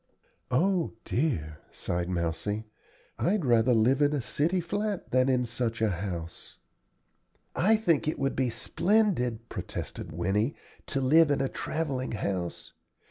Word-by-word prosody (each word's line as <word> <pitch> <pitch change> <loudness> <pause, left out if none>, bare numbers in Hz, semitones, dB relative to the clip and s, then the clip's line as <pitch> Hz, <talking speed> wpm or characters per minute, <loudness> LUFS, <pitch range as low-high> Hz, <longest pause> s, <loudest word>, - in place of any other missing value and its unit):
"O 175 +6 +1
dear!" 80 - -1
sighed 85 0 -3
Mousie, 90 +5 -2 0.5
"I'd 190 -2 +1
rather 120 0 +4
live 125 +6 +3
in 145 0 +4
a 145 - +1
city 155 +8 0
flat 205 +3 -3
than 130 +1 +3
in 125 -1 +2
such 120 0 -2
a 110 -2 +2
house." 85 -3 -6 1.0
"I 215 +6 +4
think 170 -10 +1
it 155 - 0
would 135 0 -1
be 130 -1 +1
splendid," 125 - +1
protested - - -6
Winnie, 95 - 0 0.3
"to 140 - -1
live 155 +4 +5
in 145 - +2
a 135 - +1
travelling 140 -6 -3
house. 95 -4 -3
125 Hz, 135 wpm, -28 LUFS, 105-160 Hz, 1.0 s, live